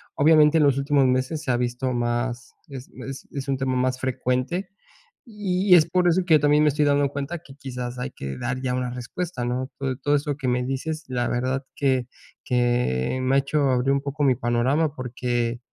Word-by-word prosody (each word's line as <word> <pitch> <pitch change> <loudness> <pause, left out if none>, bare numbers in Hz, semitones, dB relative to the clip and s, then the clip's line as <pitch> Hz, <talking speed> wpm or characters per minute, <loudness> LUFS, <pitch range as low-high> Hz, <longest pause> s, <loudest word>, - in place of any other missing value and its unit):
obviamente, 155 +1 +5
en - - +4
los 140 -2 +3
últimos 140 0 +2
meses 130 +5 0
se 130 - 0
ha 120 - +2
visto 125 +1 -1
más 120 0 -2 0.2
es 135 -2 -9 0.2
es 135 0 -8
es 140 -1 -5
un 135 - +1
tema 130 -1 -1
más 130 0 0
frecuente. 130 +7 -1 0.6
Y 200 -4 +1
y - - +11
es 160 -3 +6
por 180 +1 +2
eso 180 +2 +3
que 165 -3 +5
yo - - +5
también 150 +1 +4
me 150 - +5
estoy 150 +1 +1
dando 145 -1 +3
cuenta 140 +5 -4
que 140 -5 -15
quizás 125 -3 -6
hay 125 +2 -4
que 70 - -6
dar 125 +1 -3
ya 130 -1 -1
una 125 -1 -2
respuesta, 125 +4 -5
¿no? 125 +2 -2
Todo 130 -2 -3
todo 145 +2 +1
eso 145 -1 -1
que 135 -3 -3
me 125 0 +1
dices, 155 +5 -3
la 120 -1 -1
verdad 130 +3 -1
que 130 -3 +1 0.4
que 120 - +1
me 130 +1 +1
ha - - +5
hecho 140 +2 -1
abrir 130 +1 +2
un 140 - +2
poco 145 +1 -3
mi 130 -3 +4
panorama. 130 +6 +1
Porque 120 -2 -2
130 Hz, 215 wpm, -24 LUFS, 125-145 Hz, 0.6 s, y